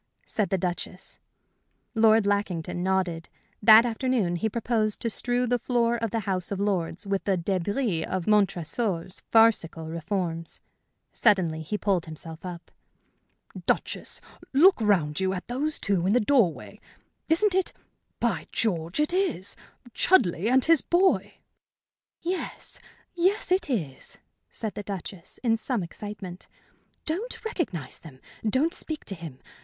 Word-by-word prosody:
said 210 -3 -1
the 190 - +1
Duchess. 180 +1 -4 0.7
Lord 220 -2 +5
Lackington 190 -4 -1
nodded. 180 -3 0 0.3
That 220 +2 +9
afternoon 230 -6 0
he 220 +6 0
proposed 220 -1 0
to 230 - 0
strew 245 +3 0
the 245 0 +1
floor 235 -1 +1
of 230 -1 -2
the 225 +2 -1
House 185 -2 -2
of 200 - -2
Lords 190 -3 -1
with 195 -1 -1
the 195 -2 +2
débris 190 +1 -1
of 185 -2 -2
Montresor's 195 -2 0
farcical 215 -8 +4
reforms. 165 0 -3 0.5
Suddenly 180 -8 +2
he 160 +7 -3
pulled 195 -6 0
himself 160 +1 -9
up. 180 -2 -8 1.0
"Duchess, - - -1 0.3
look 330 +1 +6
round 175 -8 +2
you, 190 0 +1
at 180 - -5
those 285 +5 -1
two 185 -3 +1
in 200 - +3
the 245 - +5
doorway. 220 - +1 0.5
Isn't 370 +5 +4
it 380 -1 +1 0.5
by - - 0
George, 170 - -1
it 300 +3 +2
is! 360 - 0 0.4
Chudleigh 205 - +3
and 260 +1 +4
his 330 -3 +5
boy!" 370 +2 +2 0.9
"Yes 360 +2 -3 0.3
yes, 365 +2 +1
it 370 -4 +2
is," 160 - -3 0.3
said 220 -2 -4
the - - -5
Duchess, 195 -3 -7
in 225 -2 +3
some 230 -3 -1
excitement. 190 0 -8 0.6
"Don't 425 +9 -4
recognize 265 - -3
them. 140 -6 -13 0.3
Don't 290 +9 +2
speak 315 -2 -3
to 200 - -4
him. 165 -7 -8
205 Hz, 140 wpm, -27 LUFS, 175-245 Hz, 1.0 s, That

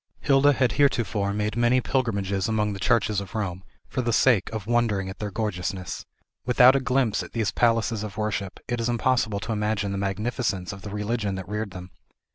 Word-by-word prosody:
Hilda 140 +1 +4
had 130 -2 +2
heretofore 110 -8 +1
made 105 +1 -2
many 120 +2 +3
pilgrimages 100 -7 -1
among 105 -2 0
the 100 - -7
churches 105 0 +2
of 100 +1 -9
Rome, 95 -4 -3 0.2
for 130 - -2
the 120 -1 0
sake 115 -3 +3
of 110 -3 -5
wondering 110 -5 +1
at 95 - -9
their 105 - -3
gorgeousness. 95 -3 -4 0.4
Without 125 +1 +6
a - - +3
glimpse 125 -4 +1
at - - -9
these 110 -3 0
palaces 115 -2 +1
of 105 -2 -6
worship, 100 -3 -3
it 120 -1 -2
is 115 - 0
impossible 120 -3 +1
to 115 - -4
imagine 105 -2 -1
the 100 - -2
magnificence 100 -1 -2
of 100 - -10
the 105 - -7
religion 105 0 -2
that 95 -2 -6
reared 105 +1 -3
them. 90 -1 -10
105 Hz, 195 wpm, -25 LUFS, 100-120 Hz, 0.4 s, Without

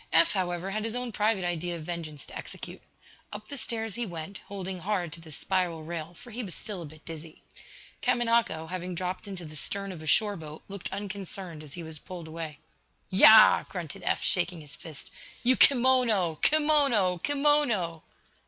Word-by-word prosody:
Eph, 165 +1 +7
however, 180 -1 -1
had 215 +1 -2
his 225 +1 -1
own 245 -1 -2
private 210 -2 +1
idea 175 0 -2
of 165 - -7
vengeance 160 -3 -5
to - - -12
execute. - - -8 0.5
Up - - -8
the 285 - -4
stairs 225 -4 -3
he 240 - -1
went, 175 -1 -6
holding 190 -2 -4
hard 180 -3 -1
to 170 - -7
the 160 -1 -12
spiral 175 0 -1
rail, 165 +1 -6
for 240 +7 -12
he 240 +3 -3
was 185 -5 -5
still 200 -5 -5
a 165 - -7
bit 155 +1 -16
dizzy. 160 -1 -9 0.6
Kamanako, 230 -9 +2
having 180 +1 -4
dropped 185 +3 -4
into 190 -4 -5
the 155 0 -10
stern 195 +6 +1
of 170 -4 -8
a 155 - -8
shore 205 +5 +4
boat, 155 -3 -9
looked 200 -2 -6
unconcerned 195 -4 -6
as 150 -3 -10
he 175 - -6
was 160 -1 -6
pulled 175 -1 -8
away. 160 -2 -6 0.5
"Yah!" 215 +3 +9
grunted 175 -6 -6
Eph, - - 0
shaking 175 -2 +2
his 145 -2 -10
fist. 155 -4 -9 0.3
"You 255 +2 +5
kimono! 245 - +4
Kimono! 280 - +3
Kimono!" 275 - +2
185 Hz, 180 wpm, -28 LUFS, 165-215 Hz, 0.6 s, Yah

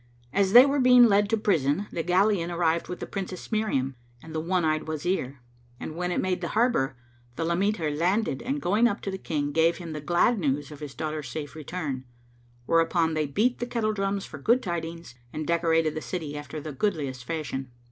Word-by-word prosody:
As 195 +1 +2
they 245 +2 +11
were 280 +1 +1
being 250 -1 +7
led 205 -2 +3
to 225 - +2
prison 170 -4 +1
the 165 - -2
galleon[FN#512] 180 0 +2
arrived 165 -1 +1
with 180 - -6
the - - -2
Princess 190 -1 -6
Miriam 140 - 0 0.3
and 160 - -10
the 160 - -1
one 175 +1 0
eyed 155 0 0
Wazir, 155 -4 -2 0.4
and 155 - -6
when 180 +1 -2
it - - -1
made 185 -1 -1
the 170 - -2
harbour, 175 - +2 0.4
the 165 - -2
lameter 170 -1 0
landed 175 0 0
and 275 +4 -2
going 210 +6 +4
up 200 - -2
to 195 - -3
the 190 - -5
King 145 -4 -2
gave 165 +2 +3
him 170 -3 -7
the 150 - -5
glad 175 +9 +2
news 145 -2 -1
of 150 - -10
his 145 -3 -8
daughter's 155 -3 -4
safe 145 +3 -6
return: 150 -4 -5 0.6
whereupon 165 +1 +2
they 155 -1 0
beat 225 - +1
the 240 - -3
kettledrums 205 -4 -1
for 150 - -9
good 235 - +3
tidings 170 -5 -5 0.2
and 155 - -4
decorated 165 -1 +2
the 155 - -4
city 155 -5 -5
after 145 +1 -6
the 155 +1 -6
goodliest 140 -6 -2
fashion. 140 -4 -4
170 Hz, 200 wpm, -27 LUFS, 150-200 Hz, 0.6 s, they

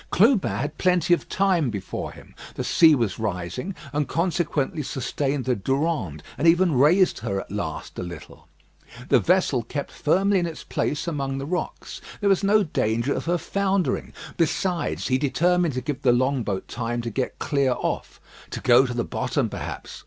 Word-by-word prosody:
Clubin 215 - +4
had 135 +10 -3
plenty 180 -1 +3
of 175 - -1
time 185 -8 +2
before 100 -4 -5
him. - - -15 0.2
The - - -3
sea 160 -2 +6
was 115 -7 -1
rising, 105 - -3 0.2
and 145 -2 0
consequently 165 -3 -1
sustained 135 0 -2
the 130 -1 +1
Durande, 130 - -1 0.2
and 165 - +2
even 175 0 +4
raised 160 +9 +4
her 100 0 -2
at - - -9
last 100 -6 -5
a - - -2
little. 85 -3 -9 0.6
The - - +6
vessel 180 -8 +2
kept 140 +5 -5
firmly 195 +5 +2
in 175 - -1
its 160 - -7
place 150 +4 -2
among 135 -4 -2
the 135 - -4
rocks; 180 +4 -4 0.2
there 205 - +2
was 195 0 +3
no 205 +1 +4
danger 115 - 0
of - - -4
her 175 +1 +1
foundering. 195 0 -1 0.3
Besides, 170 +1 0
he 130 -1 +2
determined 170 +2 +1
to 130 - -1
give 140 +1 -4
the 130 -4 +4
long 130 +2 +2
boat 100 -4 -3
time 120 0 -3
to 115 - -4
get 130 +4 -3
clear 140 -3 +1
off - - -3 0.3
to - - -5
go 130 +1 +5
to 120 - -4
the 120 - 0
bottom, - - -1
perhaps. - - -7
145 Hz, 180 wpm, -24 LUFS, 120-175 Hz, 0.6 s, sea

